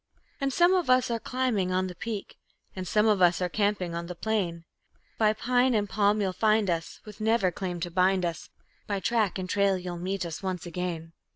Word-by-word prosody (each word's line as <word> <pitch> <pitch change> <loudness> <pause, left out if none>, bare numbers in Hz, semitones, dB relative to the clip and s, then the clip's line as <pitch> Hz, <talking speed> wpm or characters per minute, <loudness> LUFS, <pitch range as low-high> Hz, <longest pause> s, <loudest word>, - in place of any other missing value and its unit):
And 275 -1 0
some 345 +6 +4
of 360 -7 +1
us 255 -1 +4
are 230 - -1
climbing 230 -6 -1
on 185 +1 +1
the 185 - -5
peak, 215 +1 -6 0.4
And 185 -1 -5
some 210 +2 +3
of 210 -3 +3
us 175 -1 +5
are 180 -1 -1
camping 200 -3 0
on 170 0 -4
the 180 - -6
plain; 175 -4 -2 0.6
By 215 -1 +5
pine 250 +2 +2
and 205 -1 +1
palm 205 +1 +2
you'll 190 -2 0
find 215 -2 +2
us, 165 -1 -4
with 210 0 -11
never 220 -4 +2
claim 180 -1 -4
to 175 0 -3
bind 185 +1 +2
us, 170 -2 -4 0.4
By 200 -1 -1
track 215 -2 +1
and 185 -1 -4
trail 200 0 +2
you'll 180 -1 -6
meet 190 +1 -2
us 165 -2 -6
once 185 -3 -3
again. 170 -2 -4
195 Hz, 210 wpm, -28 LUFS, 180-220 Hz, 0.6 s, us